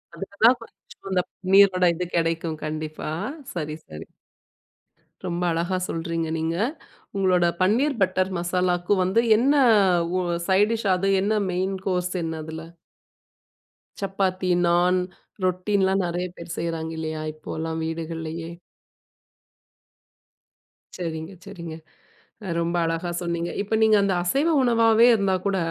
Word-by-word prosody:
அதுக்கு 200 +1 -8
தான் 250 +2 +7
கொஞ்சம் 230 - -15
அந்த 185 -1 +2 0.3
நீரோட 190 -2 +6
இது 180 +2 -3
கிடைக்கும் 165 -1 0
கண்டிப்பா. 155 0 -5 0.4
சரி, 155 -3 -4
சரி. 75 +1 -9 1.2
ரொம்ப 175 0 -2
அழகா 170 +3 -1
சொல்றீங்க, 165 -1 -2
நீங்க. 160 +1 -1 0.6
உங்களோட 185 -3 +3 0.2
பன்னீர் 245 +7 +2
பட்டர் 185 0 +1
மசாலாக்கு 175 +2 +1
வந்து 190 +5 +2 0.2
என்ன 275 +5 +3 0.6
ஒ - - +1 0.3
சைட் 200 +3 +4
டிஷ்? 220 -3 -2
அது 195 +2 -1
என்ன 215 +2 +1 0.2
மெயின் 190 +2 -1
கோர்ஸ் 180 -1 0
என்ன 160 0 -3
அதுல? 160 0 -7 1.4
சப்பாத்தி, 190 -1 -1 0.2
நாண், 180 +1 +3 0.5
ரொட்டின்னுல்லாம் 190 +1 +1
நெறைய 175 +1 -2
பேர் 170 0 -7
செய்றாங்க 165 -1 -3
இல்லையா? 155 -1 -4
இப்போல்லாம் 160 +1 -5
வீடுகள்லேயே. 165 0 -5 2.5
சரிங்க, 165 +1 -5
சரிங்க. 170 -5 -8 0.8
ரொம்ப 170 +1 -1
அழகா 165 +2 -2
சொன்னீங்க. 170 0 -2
இப்ப 210 +2 -1
நீங்க 215 -1 +5
அந்த 200 -1 +1
அசைவ 275 - +1
உணவாவே 230 -1 +5
இருந்தா 195 -3 +1
கூட, 195 -1 +1
180 Hz, 115 wpm, -24 LUFS, 165-195 Hz, 2.5 s, தான்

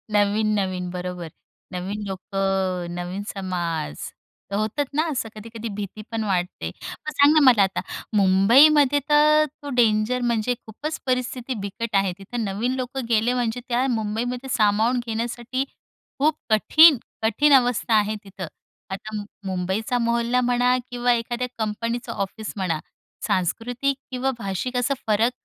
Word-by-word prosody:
नवीन-नवीन 205 -3 +1
बरोबर 180 -2 -5 0.4
नवीन 195 +4 -4
लोकं.नवीन 190 -1 -2
समाज, 175 - -3 0.6
होतात 215 +8 0
ना 310 - +3
असं 255 -5 -2
कधी-कधी 225 +1 -7
भीती 205 +1 -6
पण 225 -1 -1
वाटते. 180 -3 -2 0.2
मग 305 - -7
सांग 285 +1 +5
ना 315 - +6
मला 235 -6 +7
आता 190 0 -1 0.4
मुंबईमध्ये 265 +10 +6
तर 305 +1 +5 0.2
तो 285 - -5
डेंजर 225 +2 +3
म्हणजे 230 +2 +1
खूपच 300 +8 -5
परिस्थिती 255 0 -1
बिकट 225 +2 -4
आहे 195 -1 +3
तिथं. 225 +4 -4
नवीन 215 +6 -1
लोक 255 0 -4
गेले 230 +2 +2
म्हणजे 245 -1 -1
त्या 250 +2 +1
मुंबईमध्ये 240 +4 -3
सामावून 220 +3 +3
घेण्यासाठी 240 +3 -2 0.6
खूप 305 +2 +2
कठीण, 305 +8 +7 0.3
कठीण 280 +7 +4
अवस्था 245 -3 +3
आहे 210 +1 -1
तिथं. 195 -2 -7 0.4
आता 215 +3 -6 0.3
मुंबईचा 190 +6 -1
मोहल्ला 235 +1 +1
म्हणा 245 +1 +2
किंवा 245 0 +2
एखाद्या 240 +1 -2
कंपनीचं 230 +3 -2
ऑफिस 205 +2 -4
म्हणा, 165 -5 -1 0.5
सांस्कृतिक 245 +9 0
किंवा 255 +1 0
भाषिक 215 +5 -3
असा 255 +3 +1
फरक 220 +3 +3
225 Hz, 130 wpm, -23 LUFS, 195-250 Hz, 0.6 s, मला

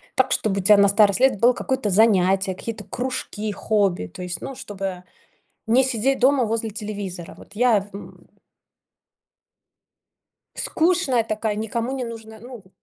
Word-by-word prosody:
Так, - - +2
чтобы 195 -2 0
у - - -11
тя 210 +2 +6
на 200 0 +5
старость 200 -1 +3
лет 260 -5 +3
было 240 +3 +5
какое-то 250 -3 -2
занятие, 190 -2 +3
какие-то 220 +1 -7
кружки, 215 -2 -4
хобби, 200 - 0
то 90 - -11
есть, 175 -2 -5
ну, 270 - -6
чтобы 195 -7 -6 0.6
не 240 +4 +4
сидеть 260 +1 0
дома 260 0 +4
возле 225 0 -2
телевизора. 200 -5 -7
Вот - - -16
я 230 -2 +3
в, 200 0 -14
м 200 - -12 2.3
Скучная 335 - +1
такая, 215 -1 -2
никому 230 +3 -3
не 260 -2 -3
нужная, 220 -1 -9
ну 240 -1 -11
в 185 - -23
215 Hz, 155 wpm, -22 LUFS, 200-245 Hz, 2.3 s, тя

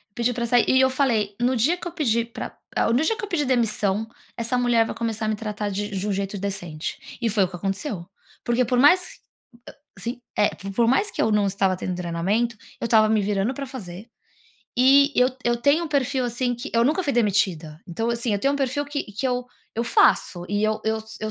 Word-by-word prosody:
pedi 240 +1 +1
pra 235 0 -2
sair 240 0 +3
e 260 - +4
eu 260 0 +5
falei: 230 -7 0
"No 250 +2 +2
dia 300 +10 +2
que 355 - -7
eu 345 - -5
pedir 235 -7 0
pra - - -7 0.2
el - - +2
no 260 +6 +3
dia 445 - +1
que - - -7
eu - - -2
pedir 305 -7 0
demissão 220 -4 0 0.3
essa 235 +1 0
mulher 240 -2 +3
vai - - -5
começar 225 -1 -2
a - - -1
me 215 - 0
tratar 210 -1 -4
de 205 +1 -2
um - - -2
j 195 +2 -2
um - - +1
jeito 195 +1 -3
decente". 175 -5 -4 0.2
E 230 - +1
foi 205 -2 +3
o - - +1
que 180 - -9
aconteceu. 195 - -3 0.4
Porque 240 +1 +2
por 245 +1 +1
mais 355 +7 +4 0.8
a - - -11
sim. 240 +1 -5 0.2
É, 205 - +4 0.3
por 235 +1 +3
mais 340 - +2
que - - -2
eu 220 - +2
não 210 -1 +3
estava 195 -1 +1
tendo 185 -1 -3
treinamento, 185 +7 -1 0.2
eu - - -3
estava 215 -1 +4
me 220 -1 +3
virando 200 +4 0
pra 275 +1 -5
fazer 205 -5 -9 0.7
e 275 +3 +6
eu 250 0 +5 0.2
eu 240 0 +2
tenho 285 +7 +2
um - - -5
perfil, 270 -2 0
assim, 245 +1 -1
que 240 +5 -7
eu 230 0 +4
nunca 315 +7 +2
fui 285 - -1
demitida. 190 -9 0
Então, 225 +7 -2
assim, 235 -1 -1
eu 205 - +1
tenho 275 +6 +1
um - - -1
perfil 280 +1 -1
que 290 0 -3
que 210 +6 -4 0.5
eu 230 - 0
faço 175 -5 +3
e 205 +1 0
eu 215 0 0
eu 220 0 0
s 220 0 -11
230 Hz, 235 wpm, -24 LUFS, 205-260 Hz, 0.8 s, e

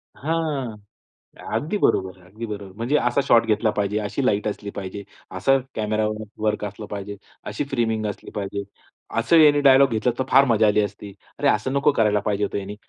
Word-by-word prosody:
हां, 145 -7 -2 0.8
अगदी 195 +8 -1
बरोबर 95 - +1
आहे, 90 - -20
अगदी 110 +4 -7
बरोबर 105 -2 -6
आहे. 95 - -13
म्हणजे 125 +6 +1
असा 125 +2 +1
शॉट 115 -4 +4
घेतला 110 0 +1
पाहिजे, 105 +1 -1
अशी 110 +6 -2
लाईट 105 -3 +1
असली 105 -1 -4
पाहिजे, 100 +1 -6 0.3
असं 135 +9 +2 0.2
कॅमेरावर 110 0 -1 0.2
वर्क 105 -1 0
असलं 105 +1 -7
पाहिजे, 100 0 -6 0.3
अशी - - -3
फ्रेमिंग 115 -4 -1
असली 105 - -7
पाहिजे, 100 0 -3 0.6
असं 170 - +4
यानी 150 -2 +6
डायलॉग 135 -1 +6
घेतलं 115 +1 0
असतं 120 +3 -3
तर 130 - -15
फार 140 +1 +7
मजा 110 -3 +3
आली 105 +1 +3
असती, 100 0 -6 0.3
"अरे, - - +2
असं 110 +5 +1
नको 140 +1 +3
करायला 105 -5 +2
पाहिजे 105 0 -1
होतं 100 - -2
यानी." 100 +1 -6
110 Hz, 195 wpm, -23 LUFS, 105-130 Hz, 0.8 s, फार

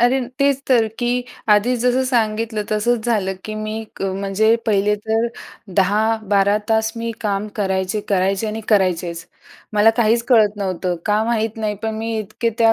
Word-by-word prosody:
अरे 245 +3 +3 0.2
तेच 280 -1 +2
तर, 235 -4 +4
की 245 0 0 0.3
आधीच 215 +4 +3
जसं 250 +1 +2
सांगितलं 225 -3 0
तसंच 225 +2 0
झालं 200 -5 0
की 215 - -5
मी 215 +1 -4
क - - -7
म्हणजे 195 +3 +1
पहिले 210 -1 +2
तर 225 +1 +1 0.5
10, 210 +4 +3
12 200 0 +2
तास 220 0 +1
मी 230 0 -3
काम 205 -1 -1
करायचे, 190 0 -1
करायचे 195 +2 +1
आणि 215 +1 -4
करायचेच. 180 -4 +1 0.5
मला 210 +1 +5
काहीच 230 0 +3
कळत 220 -5 +5
नव्हतं. 185 -2 -2
का 210 +1 +2
माहित 225 -1 -1
नाही, 215 -1 -2
पण 220 0 -2
मी 225 +1 -3
इतके 215 +2 -2
त्या 225 -1 +5
215 Hz, 165 wpm, -20 LUFS, 200-230 Hz, 0.5 s, मला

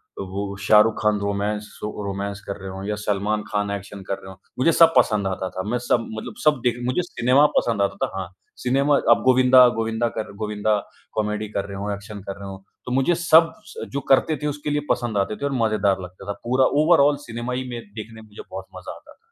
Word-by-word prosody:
तो 100 - -5
वो 100 +1 -4
शाह 105 +2 +6
रुख 115 +1 +2
खान 105 -1 +2
रोमांस, 100 +1 -2
स - - -15 0.3
रोमांस 100 0 -4
कर 100 - -4
रहे 95 - -6
हों 95 +1 -7
या 105 +1 -2
सलमान 105 +1 0
खान 105 -1 -1
एक्शन 100 0 -6
कर 100 - -1
रहे 95 - -11
हों, - - -12 0.2
मुझे 150 +6 +4
सब 165 0 +6
पसंद 105 -5 +3
आता 95 0 -3
था। 95 - -5
मैं 120 - +1
सब 115 -1 +2
मतलब 115 +1 -6
सब 150 -3 +4
देख 120 -2 +2
मुझे 125 +8 +1
सिनेमा 135 -4 +3
पसंद 115 -4 +1
आता 100 - +1
था - - -8
हाँ, 95 -1 -3 0.4
सिनेमा 135 +3 +3 0.2
अब - - +5
गोविंदा 130 0 +7
गोविंदा 115 +1 0
कर 110 - -5
गोविंदा 105 0 0 0.4
कॉमेडी 105 0 -2
कर 100 - -2
रहे 100 -1 -7
हों, 100 +1 -3
एक्शन 100 +1 -8
कर 100 0 -6
रहे 100 - -7
हों, 95 - -7 0.3
तो - - -5
मुझे 135 +7 +2
सब 165 -1 +5 0.2
स - - -6
जो 140 - -2
करते 150 +3 +4
थे - - +1
उसके 150 0 -4
लिए 145 0 0
पसंद 120 -4 0
आते 100 +2 0
थे 140 - -4
और 140 - -1
मज़ेदार 105 -4 +1
लगता 90 +1 -10
था। - - -3
पूरा 130 +2 +3 0.2
ओवरआल 150 -3 +5
सिनेमा 120 +1 -5
ही 130 +1 -3
में 120 -1 -5 0.2
देखने 110 0 -8
में 110 - -16
मुझे 105 0 -11
बहुत - - -6
मज़ा - - -7
आता - - -16
था। - - -19
110 Hz, 235 wpm, -23 LUFS, 100-130 Hz, 0.4 s, गोविंदा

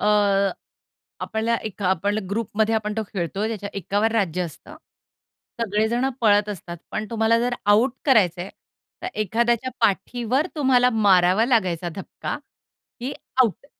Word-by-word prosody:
अ, - - -2 1.2
आपल्याला 220 +1 -1
एक 210 -1 -6
आपल्याला 195 +3 +1
ग्रुपमध्ये 220 +1 0
आपण 210 -1 -1
तो - - +1
खेळतोय, 195 +3 -2
त्याच्या 205 -3 -4
एकावर 205 +4 0
राज्य 185 -6 0
असतं. 175 - -9 0.8
सगळे 215 -1 +1
जणं 245 +3 0
पळत 210 -2 +4
असतात, 175 -4 -6
पण 215 - -3
तुम्हाला 230 0 +2
जर 245 +1 0 0.2
आउट 225 +5 +4
करायचं 195 - +3
आहे, 190 - -8 0.5
तर - - -3
एखाद्याच्या 235 +4 +1
पाठीवर 235 - +1
तुम्हाला 255 -4 +4 0.2
मारावा 185 +2 +5
लागायचा 185 -8 +1
धक्का 195 - -5 0.6
की 255 +3 -3 0.3
आउट. 235 +3 -2
215 Hz, 135 wpm, -23 LUFS, 195-235 Hz, 1.2 s, मारावा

